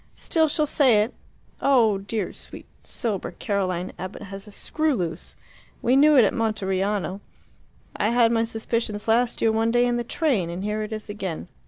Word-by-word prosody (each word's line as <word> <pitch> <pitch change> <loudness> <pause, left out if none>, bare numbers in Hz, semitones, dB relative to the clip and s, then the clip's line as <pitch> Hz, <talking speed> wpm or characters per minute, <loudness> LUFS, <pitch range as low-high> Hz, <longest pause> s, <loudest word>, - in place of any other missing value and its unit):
Still 320 -1 +1
she'll 305 +1 +1
say 255 -8 +4
it. 225 - -6 0.5
Oh, 230 -7 +4
dear, 200 0 -3
sweet, - - -9 0.2
sober 205 -7 -3
Caroline 185 -3 -2
Abbott 185 +3 -6
has 195 0 -8
a - - -11
screw 310 +7 -1
loose! 170 -6 -4 0.5
We 245 +2 +3
knew 295 +1 +6
it 240 - +7
at - - +1
Monteriano. 200 -3 -1 0.7
I 210 - +1
had 235 -1 +4
my 225 -1 +2
suspicions 225 -1 -3
last 235 +2 +2
year 225 - +4
one 225 +1 +1
day 240 +1 +3
in 240 0 +1
the 240 - -1
train; 235 - 0
and 175 +3 -5
here 210 +1 -2
it 215 +1 -5
is 215 -1 -5
again. 195 -6 -5
220 Hz, 180 wpm, -24 LUFS, 200-240 Hz, 0.7 s, it